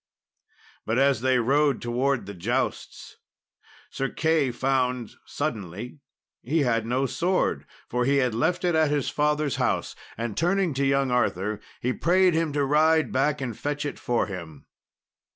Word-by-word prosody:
But 110 Hz, +2 st, -1 dB
as 135 Hz, -3 st, +3 dB
they 130 Hz, 0 st, +3 dB
rode 140 Hz, +2 st, +2 dB
towards 125 Hz, 0 st, 0 dB
the 100 Hz, -, -7 dB
jousts, 120 Hz, +9 st, -3 dB, 0.7 s
Sir 135 Hz, 0 st, -2 dB
Key 160 Hz, -4 st, +1 dB
found 125 Hz, -1 st, -1 dB, 0.2 s
suddenly 115 Hz, -, -5 dB, 0.4 s
he 155 Hz, +6 st, 0 dB
had 115 Hz, -4 st, +1 dB
no 130 Hz, +3 st, +1 dB
sword, 180 Hz, +7 st, 0 dB, 0.2 s
for 125 Hz, +1 st, -1 dB
he 140 Hz, +3 st, +2 dB
had 125 Hz, -4 st, +1 dB
left 175 Hz, +10 st, 0 dB
it 175 Hz, -, +2 dB
at 160 Hz, -1 st, +3 dB
his 145 Hz, -2 st, 0 dB
father's 150 Hz, -1 st, 0 dB
house; -, -, -1 dB, 0.2 s
and 115 Hz, -2 st, -3 dB
turning 180 Hz, -1 st, +1 dB
to 135 Hz, +1 st, 0 dB
young 135 Hz, -1 st, +1 dB
Arthur, 105 Hz, -4 st, 0 dB, 0.2 s
he 125 Hz, +1 st, 0 dB
prayed 180 Hz, +4 st, +3 dB
him 160 Hz, -1 st, 0 dB
to 145 Hz, -1 st, +1 dB
ride 155 Hz, +3 st, +3 dB
back 140 Hz, +2 st, +1 dB
and 120 Hz, -4 st, -3 dB
fetch 145 Hz, +5 st, -3 dB
it 145 Hz, -, -5 dB
for 120 Hz, -1 st, 0 dB
him. 85 Hz, -7 st, -8 dB
135 Hz, 155 wpm, -25 LUFS, 120-150 Hz, 0.7 s, as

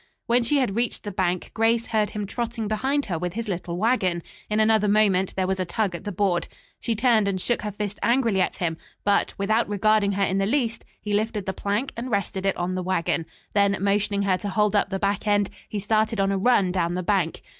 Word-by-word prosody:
When 240 Hz, +1 st, +3 dB
she 260 Hz, +5 st, +2 dB
had 250 Hz, -8 st, 0 dB
reached 235 Hz, +1 st, -1 dB
the 205 Hz, -, -5 dB
bank, 180 Hz, -2 st, -1 dB
Grace 225 Hz, +1 st, +2 dB
heard 215 Hz, -2 st, 0 dB
him 210 Hz, -1 st, -4 dB
trotting 230 Hz, +1 st, -3 dB
behind 265 Hz, +7 st, 0 dB
her 175 Hz, -6 st, -3 dB
with 180 Hz, 0 st, -3 dB
his 230 Hz, +2 st, -4 dB
little 175 Hz, -2 st, -3 dB
wagon. 185 Hz, -6 st, +1 dB, 0.3 s
In 210 Hz, 0 st, +1 dB
another 215 Hz, -1 st, +4 dB
moment 200 Hz, -3 st, +2 dB
there 190 Hz, -, 0 dB
was 190 Hz, 0 st, -1 dB
a -, -, +1 dB
tug 185 Hz, +2 st, -1 dB
at 170 Hz, -, -7 dB
the 205 Hz, -, -3 dB
board. 185 Hz, -2 st, 0 dB, 0.3 s
She 230 Hz, -, -1 dB
turned 225 Hz, -2 st, +3 dB
and 190 Hz, -1 st, -1 dB
shook 240 Hz, +6 st, -1 dB
her 210 Hz, -, -3 dB
fist 205 Hz, 0 st, -4 dB
angrily 230 Hz, -4 st, +2 dB
at -, -, 0 dB
him; 165 Hz, -2 st, -1 dB, 0.3 s
but, 205 Hz, -1 st, +1 dB
without 215 Hz, +3 st, +1 dB
regarding 205 Hz, 0 st, +2 dB
her 200 Hz, +1 st, +1 dB
in 190 Hz, 0 st, +1 dB
the 195 Hz, -, +1 dB
least, 235 Hz, -2 st, -1 dB
he 210 Hz, 0 st, -4 dB
lifted 210 Hz, -1 st, -1 dB
the 190 Hz, -, -2 dB
plank 205 Hz, +8 st, -2 dB
and 240 Hz, +2 st, -5 dB
rested 195 Hz, -2 st, -1 dB
it 195 Hz, -, 0 dB
on 175 Hz, +1 st, -2 dB
the 185 Hz, -, -2 dB
wagon. 175 Hz, -2 st, -1 dB, 0.3 s
Then 200 Hz, -1 st, +3 dB
motioning 200 Hz, +1 st, +1 dB
her 185 Hz, -2 st, +1 dB
to 205 Hz, -, -4 dB
hold 210 Hz, +1 st, +1 dB
up 200 Hz, -, +2 dB
the 195 Hz, -, -2 dB
back 200 Hz, +2 st, -1 dB
end, 205 Hz, -1 st, +2 dB, 0.2 s
he 210 Hz, -, -4 dB
started 215 Hz, +2 st, +1 dB
on 195 Hz, 0 st, +2 dB
a 195 Hz, -, 0 dB
run 200 Hz, -4 st, +3 dB
down 175 Hz, -1 st, 0 dB
the 185 Hz, -, -2 dB
bank. 180 Hz, -3 st, 0 dB
205 Hz, 235 wpm, -24 LUFS, 190-220 Hz, 0.3 s, another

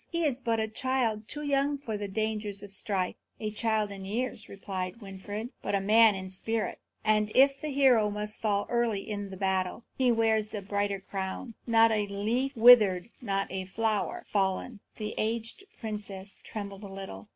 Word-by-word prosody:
He 335 Hz, -1 st, -1 dB
is 270 Hz, -4 st, 0 dB
but 230 Hz, -2 st, +1 dB
a 220 Hz, -, 0 dB
child, 225 Hz, -2 st, -1 dB
too 295 Hz, +7 st, -4 dB
young 285 Hz, 0 st, +1 dB
for 235 Hz, -6 st, -5 dB
the 205 Hz, 0 st, -3 dB
dangers 210 Hz, -1 st, -2 dB
of 200 Hz, -1 st, -9 dB
strife." 190 Hz, -2 st, -1 dB, 0.3 s
"A 215 Hz, -1 st, -3 dB
child 215 Hz, -1 st, 0 dB
in 195 Hz, -1 st, -7 dB
years," 215 Hz, +3 st, -3 dB
replied 190 Hz, 0 st, -5 dB
Winfried, 205 Hz, +3 st, -6 dB
"but -, -, -1 dB
a -, -, +2 dB
man 215 Hz, +2 st, +6 dB
in 190 Hz, 0 st, -6 dB
spirit. 225 Hz, +4 st, -2 dB, 0.3 s
And 215 Hz, 0 st, +3 dB
if 275 Hz, +1 st, +5 dB
the 310 Hz, -, -3 dB
hero 260 Hz, -6 st, +4 dB
must 210 Hz, +1 st, -3 dB
fall 205 Hz, -2 st, +1 dB
early 235 Hz, -4 st, 0 dB
in 205 Hz, -2 st, -4 dB
the 190 Hz, -, -8 dB
battle, 190 Hz, +2 st, 0 dB
he 255 Hz, -2 st, +3 dB
wears 220 Hz, -2 st, +2 dB
the 210 Hz, -2 st, -5 dB
brighter 200 Hz, 0 st, -1 dB
crown, 195 Hz, +5 st, -5 dB
not 225 Hz, -1 st, +5 dB
a 210 Hz, -2 st, +1 dB
leaf 230 Hz, +7 st, -1 dB
withered, 220 Hz, -5 st, +7 dB
not 195 Hz, -5 st, -1 dB
a 190 Hz, 0 st, -3 dB
flower 215 Hz, +1 st, -1 dB
fallen." 200 Hz, +3 st, 0 dB, 0.2 s
The 215 Hz, -1 st, -4 dB
aged 225 Hz, -, -2 dB
princess 205 Hz, -3 st, -5 dB
trembled 200 Hz, -2 st, -6 dB
a -, -, -6 dB
little. 195 Hz, -, -8 dB
210 Hz, 180 wpm, -29 LUFS, 195-230 Hz, 0.3 s, withered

